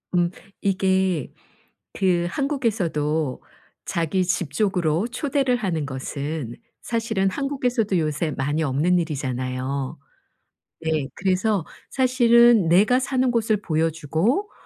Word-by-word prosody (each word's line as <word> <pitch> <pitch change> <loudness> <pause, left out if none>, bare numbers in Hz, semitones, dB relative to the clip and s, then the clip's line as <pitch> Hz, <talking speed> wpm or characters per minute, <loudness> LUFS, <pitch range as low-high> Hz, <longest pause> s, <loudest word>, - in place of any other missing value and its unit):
음 175 -1 +3 0.3
이게 190 -5 +1 0.6
그 180 -3 +1
한국에서도 170 - -1 0.4
자기 170 +3 0
집 175 -4 -1
쪽으로 180 -1 +1
초대를 265 0 0
하는 175 -9 -2
것은 140 -1 -5 0.3
사실은 225 -5 0
한국에서도 245 -4 -1
요새 155 +1 -1
많이 145 +3 -1
없는 155 +6 +2
일이잖아요. 130 -2 -3 0.8
네. 155 -3 -1
그래서 190 0 0 0.3
사실은 240 -5 +5
내가 210 +9 +5
사는 260 -1 +1
곳을 225 -2 +1
보여주고 165 - 0
180 Hz, 240 characters per minute, -23 LUFS, 155-230 Hz, 0.8 s, 사실은